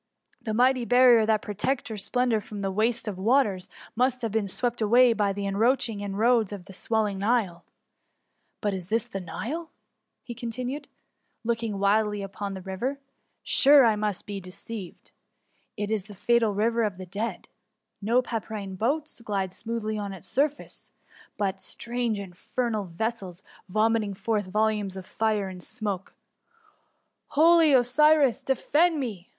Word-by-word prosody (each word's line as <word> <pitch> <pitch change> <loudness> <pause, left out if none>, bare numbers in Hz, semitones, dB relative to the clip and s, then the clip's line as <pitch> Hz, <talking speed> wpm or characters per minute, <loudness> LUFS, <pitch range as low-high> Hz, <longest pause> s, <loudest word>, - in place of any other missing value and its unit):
The 220 -1 -3
mighty 255 +1 +3
barrier 245 -2 +5
that 215 -1 +2
protected 245 +6 -2
her 220 - -5
splendour 230 +2 0
from 205 0 -8
the 195 -1 -1
waste 225 +3 0
of 195 -3 -4
waters, 210 -4 +2 0.3
must 250 +1 +1
have 225 - -1
been 215 -1 0
swept 240 +4 -2
away 240 +3 +5
by 205 -3 +1
the 200 0 -4
encroaching 225 +2 +1
in 200 -1 -4
roads 225 -1 +3
of 195 -3 -7
the 195 - -12
swelling 210 0 -1
Nile. 200 -5 0 1.0
But 205 -2 0
is 185 -2 -5
this 225 0 +1
the 195 - -5
NUe?*^ 245 - -5 0.7
continued 250 +4 -4
he, - - -44 0.5
looking 230 -3 -1
wildly 205 +1 +2
upon 195 0 -5
the 190 - -8
river; 195 +9 -3 0.5
sure 280 -1 +6
I 220 -2 +4
must 210 -2 -2
be 205 -1 -5
deceived. 185 +1 -8 0.7
It 210 0 -3
is 210 -4 -1
the 205 - -11
fatal 230 +1 +2
river 230 +3 +1
of 210 -5 -1
the 185 - -7
dead. 205 +6 -4 0.5
No 235 +5 +2
pdpyrine 215 -5 -5
boats 290 +3 -1
glide 195 -4 -2
smoothly 215 -1 -3
on 200 -1 -4
its 185 - -9
surface; 290 +2 -2 0.5
but 195 -2 -1
strange, 235 -3 -2
in 195 -2 -7
fernal 220 +2 -2
vessels, 190 -1 -4 0.3
vomiting 215 0 +1
forth 210 -1 -1
volumes 210 -1 0
of 185 - -7
fire 215 -1 0
and 185 -1 -8
smoke. 200 -3 -4 1.1
Holy 325 +1 +5
Osiris, 275 +1 +4
defend 305 +5 +2
me 210 -9 -5
220 Hz, 155 wpm, -26 LUFS, 200-240 Hz, 1.1 s, sure